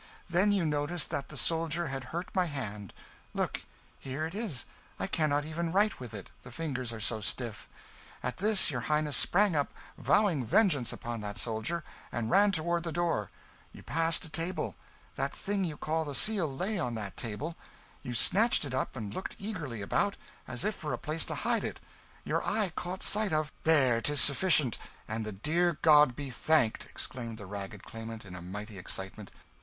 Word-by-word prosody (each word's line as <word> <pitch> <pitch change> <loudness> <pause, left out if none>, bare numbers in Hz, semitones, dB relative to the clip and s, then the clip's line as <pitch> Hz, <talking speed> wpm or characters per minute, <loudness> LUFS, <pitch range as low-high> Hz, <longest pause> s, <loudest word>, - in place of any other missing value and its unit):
Then 180 +4 +3
you 195 -4 +2
noticed 150 +2 0
that 140 -1 -2
the 150 - -8
soldier 165 +3 +1
had 135 -1 -4
hurt 170 +7 -5
my 185 -1 +3
hand 105 - -5 0.4
look! - - 0 0.4
here 135 +4 -3
it 160 - -5
is, 200 - -1 0.3
I - - 0
cannot 145 -2 +1
yet 155 - -7
even 165 +1 -1
write 205 +3 +3
with 120 -4 -7
it, - - -8
the 125 - -11
fingers 130 -4 -3
are 115 - -6
so 110 0 0
stiff. 105 +2 -3 0.5
At 125 - -2
this 205 -3 +4
your 125 -3 -2
Highness 150 0 +1
sprang 200 -1 +4
up, 145 -1 +1 0.3
vowing 195 -9 +3
vengeance 145 - +3
upon 115 -1 -5
that 105 +1 -5
soldier, 115 +10 -2 0.3
and 115 -1 -2
ran 205 +1 +6
towards 170 -1 +1
the 165 - -3
door 165 - 0 0.4
you - - -11
passed 165 +1 +1
a - - -10
table 165 +4 -2 0.4
that 135 +1 -1
thing 200 -1 0
you 155 -4 -4
call 160 +1 0
the 145 -2 -4
Seal 195 -7 +3
lay 190 +9 -2
on 120 -8 -1
that 105 -3 -5
table 130 +9 -3 0.5
you 125 -3 -4
snatched 210 - +4
it 135 - -5
up 130 - -1
and 105 -5 -5
looked 185 - -4
eagerly 155 - -4
about, 200 - +1 0.3
as 125 -2 -2
if 215 - +1
for 155 -6 -4
a - - -1
place 155 +1 -1
to - - -2
hide - - 0
it - - -4 0.4
your - - 0
eye 210 -5 0
caught 180 +1 -4
sight 210 -2 +2
of 155 0 +1
" - - -30
"There, 135 -7 +5
'tis 145 +5 +2
sufficient! 145 - +5 0.3
and 110 0 -3
the - - -3
good 160 - +1
God 150 -5 +7
be 140 -1 -5
thanked!" 130 -3 +2
exclaimed 115 -3 -4
the 105 - -8
ragged 100 +1 -6
claimant, 115 -1 -7
in 90 - -10
a 90 - -7
mighty 100 +3 -7
excitement. 95 +3 -5
150 Hz, 190 wpm, -31 LUFS, 115-170 Hz, 0.5 s, God